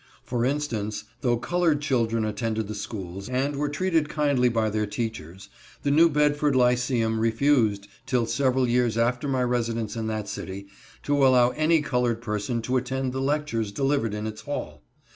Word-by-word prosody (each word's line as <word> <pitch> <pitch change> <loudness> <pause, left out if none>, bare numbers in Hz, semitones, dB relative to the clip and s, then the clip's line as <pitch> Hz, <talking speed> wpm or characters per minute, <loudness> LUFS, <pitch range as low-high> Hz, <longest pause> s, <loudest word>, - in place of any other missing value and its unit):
For 120 -1 -2
instance, 115 -8 -2 0.2
though 120 -2 +2
colored 165 +4 +1
children 115 -6 0
attended 110 0 -2
the 105 - -5
schools, 100 -1 -6
and 135 +3 0
were 145 +1 -1
treated 160 0 0
kindly 140 -5 +2
by 110 -2 0
their 105 0 -1
teachers, 100 -5 -5 0.4
the 140 - +1
New 165 +3 +6
Bedford 150 -1 +2
Lyceum 125 -2 +2
refused, 115 -3 +2 0.2
till 125 -2 +1
several 130 +1 +1
years 120 -1 +1
after 120 +4 +1
my 130 -2 +1
residence 115 -3 -1
in 110 -1 -3
that 110 -2 -3
city, 100 0 -6 0.4
to 145 -1 +2
allow 125 -2 +5
any 155 +3 +2
colored 125 -4 0
person 115 +1 -3
to 125 +3 0
attend 130 0 -2
the 130 - -2
lectures 135 -7 -1
delivered 135 -2 0
in 105 0 -4
its 110 0 -6
hall. 145 +6 -5
125 Hz, 165 wpm, -25 LUFS, 110-140 Hz, 0.4 s, New